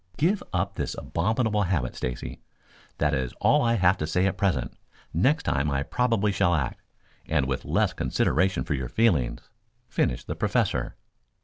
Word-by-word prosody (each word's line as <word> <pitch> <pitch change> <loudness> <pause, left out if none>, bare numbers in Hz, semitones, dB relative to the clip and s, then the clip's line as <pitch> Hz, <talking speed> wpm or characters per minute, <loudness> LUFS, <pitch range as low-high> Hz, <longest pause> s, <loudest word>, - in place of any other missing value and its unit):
Give 180 +9 +2
up 95 +2 -1
this - - -2
abominable 105 - 0
habit, 85 -10 -1
Stacy. 60 +1 -5 0.6
That 75 0 +1
is 65 -4 -1
all - - +3
I 115 -1 +2
have 95 -2 +4
to 75 - -2
say 90 +3 +1
at 95 - +1
present. 90 -11 0 0.4
Next 135 - +2
time 70 0 0
I 70 -1 0
probably 115 - +1
shall 85 -2 +2
act, 70 -6 -2 0.5
and - - +1
with 65 -1 -3
less - - +1
consideration 95 -8 +1
for 75 +1 -2
your 65 -3 -3
feelings," 85 - +1 0.4
finished - - 0
the - - -4
Professor. - - 0
90 Hz, 165 wpm, -26 LUFS, 70-105 Hz, 0.6 s, have